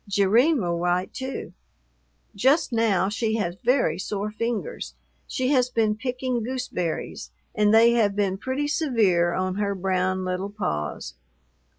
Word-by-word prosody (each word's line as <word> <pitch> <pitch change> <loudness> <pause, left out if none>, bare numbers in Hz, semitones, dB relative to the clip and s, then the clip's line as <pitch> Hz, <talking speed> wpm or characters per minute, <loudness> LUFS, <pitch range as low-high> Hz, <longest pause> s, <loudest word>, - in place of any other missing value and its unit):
Jerrine 220 +10 +3
will 170 -4 -1
write 180 +1 0
too. 260 0 -5 0.8
Just 265 - +2
now 220 -5 +2
she 220 +2 -1
has 175 -6 -2
very 240 - +2
sore 205 +2 -3
fingers. 230 - -4 0.3
She 255 0 -1
has 255 -3 +3
been 220 -3 +1
picking 250 +1 -2
gooseberries, 235 -9 -4 0.2
and 210 -1 +3
they 225 +2 +6
have 215 -4 +2
been 195 -2 0
pretty 265 +5 -2
severe 215 - +2
on 185 0 -1
her 200 -1 -1
brown 185 0 0
little 185 +2 -2
paws. 75 - -4
210 Hz, 135 wpm, -25 LUFS, 185-250 Hz, 0.8 s, they